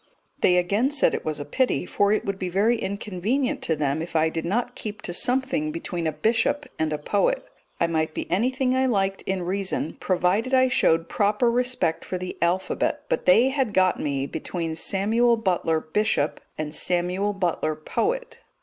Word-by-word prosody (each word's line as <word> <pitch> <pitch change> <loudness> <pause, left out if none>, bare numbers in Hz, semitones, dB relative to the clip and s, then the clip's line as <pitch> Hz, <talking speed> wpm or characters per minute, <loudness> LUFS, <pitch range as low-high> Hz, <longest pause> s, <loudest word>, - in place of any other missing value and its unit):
They 180 - +4
again 200 +9 +2
said 290 -1 +2
it - - -2
was 155 -1 -3
a 145 - -5
pity, 250 - 0
for 205 0 +1
it 215 - +1
would 195 -1 -3
be 185 - -2
very 205 +6 +2
inconvenient 210 +5 -2
to 160 - 0
them 145 0 -1
if 165 0 -7
I 160 0 +3
did 165 0 -4
not 240 +7 -1
keep 210 -3 -6
to 175 - -3
something 265 - +1
between 180 - -3
a - - +1
bishop 225 - 0
and 160 -1 0
a 150 - -1
poet. 205 - 0 0.3
I - - +3
might 160 -1 -1
be - - -3
anything 255 +6 +1
I 260 0 +2
liked 195 -4 0
in 190 -1 -1
reason, 190 -3 -2
provided 195 +8 +1
I 260 0 +4
showed 165 -8 +2
proper 210 +6 +2
respect 245 -9 0
for 185 - -4
the 180 0 -5
alphabet; 180 +2 0
but - - -1
they 230 +8 +6
had 265 -6 -1
got 185 -1 +3
me 140 -2 -1
between 160 +2 -4
"Samuel 225 +7 +2
Butler, 175 -6 +1
bishop," 160 -2 0 0.2
and 155 -1 -4
"Samuel 180 +4 0
Butler, 170 -5 -1
poet." 480 - -2
195 Hz, 185 wpm, -24 LUFS, 165-240 Hz, 0.3 s, they